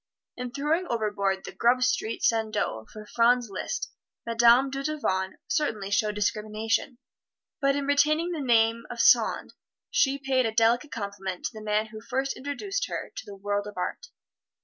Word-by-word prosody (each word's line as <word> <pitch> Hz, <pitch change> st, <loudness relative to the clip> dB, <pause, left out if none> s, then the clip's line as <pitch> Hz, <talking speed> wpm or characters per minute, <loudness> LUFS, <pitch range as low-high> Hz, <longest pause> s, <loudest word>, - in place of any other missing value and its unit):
In 250 Hz, 0 st, -5 dB
throwing 305 Hz, +7 st, 0 dB
overboard 205 Hz, -4 st, -1 dB
the -, -, -6 dB
Grub 250 Hz, +2 st, +2 dB
Street 230 Hz, -2 st, 0 dB
Sandeau 215 Hz, -, 0 dB
for 215 Hz, -1 st, -10 dB
Franz 235 Hz, 0 st, +2 dB
Liszt, 340 Hz, -, -4 dB, 0.3 s
Madame 235 Hz, +3 st, +5 dB
Dudevant 275 Hz, -10 st, -2 dB
certainly 220 Hz, -, -1 dB
showed 210 Hz, +1 st, +1 dB
discrimination; 215 Hz, +4 st, -1 dB, 0.6 s
but 275 Hz, -2 st, +2 dB
in 285 Hz, -1 st, -1 dB
retaining 305 Hz, +4 st, +2 dB
the 325 Hz, -4 st, -3 dB
name 230 Hz, -2 st, +2 dB
of 240 Hz, -, -7 dB
"Sand," -, -, +4 dB, 0.4 s
she 275 Hz, 0 st, +3 dB
paid 265 Hz, -3 st, +1 dB
a -, -, -2 dB
delicate 235 Hz, +5 st, +2 dB
compliment 200 Hz, -4 st, -5 dB
to -, -, -2 dB
the 215 Hz, -, -9 dB
man 215 Hz, 0 st, 0 dB
who 215 Hz, -1 st, -9 dB
first 270 Hz, +4 st, -2 dB
introduced 390 Hz, -, -3 dB
her -, -, -5 dB
to -, -, -7 dB
the 200 Hz, -, -8 dB
world 205 Hz, +1 st, -2 dB
of 205 Hz, -, -10 dB
art. 180 Hz, -, -4 dB
230 Hz, 160 wpm, -27 LUFS, 210-275 Hz, 0.6 s, Madame